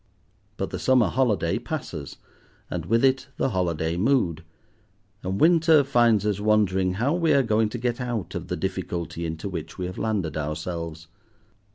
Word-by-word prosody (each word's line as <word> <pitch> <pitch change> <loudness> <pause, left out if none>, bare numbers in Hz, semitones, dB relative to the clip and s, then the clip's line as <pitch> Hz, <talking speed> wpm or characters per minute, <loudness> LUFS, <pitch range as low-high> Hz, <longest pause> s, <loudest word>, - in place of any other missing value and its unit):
But - - -3
the - - -4
summer 130 -3 +4
holiday 115 -6 +1
passes, - - -6 0.5
and 85 -2 -4
with 115 +5 +3
it 130 0 +2
the - - +1
holiday 85 -4 -1
mood, 95 - +1 0.8
and 95 +1 -3
winter 165 -2 +5
finds 120 -6 +3
us 105 -2 0
wondering 100 -3 +2
how 120 +10 0
we 170 -2 +2
are 140 - +4
going 110 -1 +2
to 120 - -5
get 120 +1 -2
out 120 -6 -3
of - - -5
the - - -3
difficulty 85 -1 -3
into 80 +4 -5
which 85 -4 -6
we 90 - -3
have 90 +1 -6
landed 100 -9 -1
ourselves. 80 +1 -4
105 Hz, 165 wpm, -25 LUFS, 85-125 Hz, 0.8 s, winter